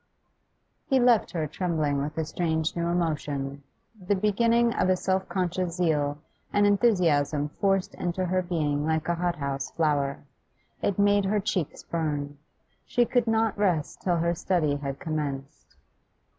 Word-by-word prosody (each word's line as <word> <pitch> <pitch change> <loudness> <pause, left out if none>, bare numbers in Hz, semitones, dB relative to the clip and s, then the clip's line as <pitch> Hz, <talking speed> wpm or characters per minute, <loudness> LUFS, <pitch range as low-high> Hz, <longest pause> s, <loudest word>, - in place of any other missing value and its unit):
He 265 -2 +3
left 240 -3 +4
her 160 -3 -2
trembling 155 -3 -1
with 150 +2 -4
a 160 - 0
strange 160 -1 -1
new 170 0 -1
emotion, 145 -5 -2 0.5
the 205 - +3
begin 210 +4 +1
fling 235 0 +3
of 185 - +1
a 185 - +4
self 190 +1 -1
conscious 180 -2 -1
zeal, 150 -5 +1 0.3
an 205 0 +3
enthusiasm 170 -9 +2
forced 195 -2 +1
into 180 +1 -2 0.2
being 150 -4 0
like 160 0 0
a 170 - +2
hothouse 150 -6 -2
flower. 145 -4 0 0.6
It 200 - 0
made 205 0 +3
her 205 +2 +1
cheeks 190 -6 -2
burn; 145 -3 -3 0.4
she 240 - +2
could 240 -1 +1
not 225 -1 +2
rest 180 -7 0
till 175 -2 +1
her 170 +1 +1
study 160 -4 0
had 140 -1 -4
commenced. 145 -4 -5
170 Hz, 145 wpm, -27 LUFS, 150-195 Hz, 0.6 s, left